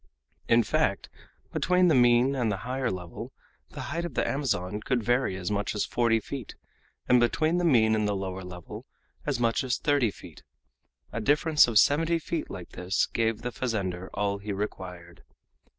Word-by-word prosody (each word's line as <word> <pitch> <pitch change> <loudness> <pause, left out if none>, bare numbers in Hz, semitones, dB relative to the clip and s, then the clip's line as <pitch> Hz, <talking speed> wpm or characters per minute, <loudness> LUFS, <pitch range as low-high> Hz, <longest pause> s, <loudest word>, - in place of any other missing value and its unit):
In 115 0 +5
fact, - - 0 0.4
between 180 0 +3
the 165 - +4
mean 120 +1 +4
and 120 -5 0
the 100 - -2
higher 130 +1 -1
level 90 -2 -6 0.4
the - - -8
height 170 0 -2
of 170 -7 -6
the - - +1
Amazon 105 -8 -1
could 125 0 -1
vary 120 -3 +1
as 90 +1 -3
much 105 +1 -1
as 105 - 0
forty 115 -2 +2
feet, 125 +1 -7 0.5
and 125 - +5
between 155 +8 +2
the - - -1
mean 115 -9 +4
and 105 -1 +1
the 105 - 0
lower 95 -1 -4
level 90 -2 -9 0.4
as 140 -4 0
much 115 +2 +1
as 130 -1 0
thirty 145 -6 +2
feet. - - -12 0.7
A 115 - -2
difference 150 +4 +4
of 115 -3 +1
seventy 165 +9 +4
feet 165 0 -4
like 90 -2 -8
this 90 +2 0
gave 115 -1 -1
the 125 - -3
fazender 95 -7 -3
all 100 -1 -1
he 105 +1 -5
required. 90 -4 -6
115 Hz, 180 wpm, -27 LUFS, 100-135 Hz, 0.7 s, In